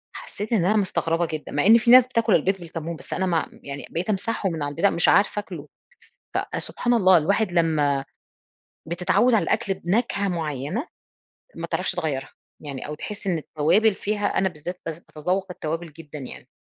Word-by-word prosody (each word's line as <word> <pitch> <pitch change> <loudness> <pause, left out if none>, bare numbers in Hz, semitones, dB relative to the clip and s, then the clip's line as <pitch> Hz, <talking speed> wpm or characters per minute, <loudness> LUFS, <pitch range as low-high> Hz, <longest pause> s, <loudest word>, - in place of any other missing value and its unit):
حسيت 210 +3 -5
إن 190 -6 +3
أنا 210 +4 +3
مستغربة 170 -4 0
جدًا، 155 -1 -6
مع 145 - 0
إن 225 +3 +8
في 235 +1 +3
ناس 255 0 +9
بتاكل 230 -5 +2
البيض 195 +1 +2
بالكمون، 165 -1 -6
بس - - -8
أنا 190 - 0
م 170 -3 -1
يعني 140 0 -7
بقيت 175 +5 -3
امسحه 210 0 -1
من 160 -3 -3
على 145 - -2
البتاع، 165 +7 +2
مش 170 - +2
عارفه 205 +1 +3
آكْله، 170 -7 -8 0.7
فسبحان 245 0 -1
الله! 190 -5 +6
الواحد 195 +4 +1
لما 150 -5 +2 0.8
بتتعوّد 180 +8 +2
على 220 - +4
الأكل 215 -4 0
بنكهة 200 +2 0
معينة، 160 - -3 0.7
ما - - -4
تعرفش - - -1
تغيّرها 135 -4 -3 0.3
يعني، 140 -3 -6
أو 150 - -5
تحس 200 +6 -7
إن 180 -4 +1
التوابل 180 +9 +2
فيها 205 +1 -1
أنا 190 - +3
بالذات 180 +2 -7
بذ 165 -1 -4
باتذوّق 180 +5 -2
التوابل 165 -1 -4
جدًا 155 -1 -10
يعني. 130 - -9
180 Hz, 175 wpm, -24 LUFS, 155-205 Hz, 0.8 s, ناس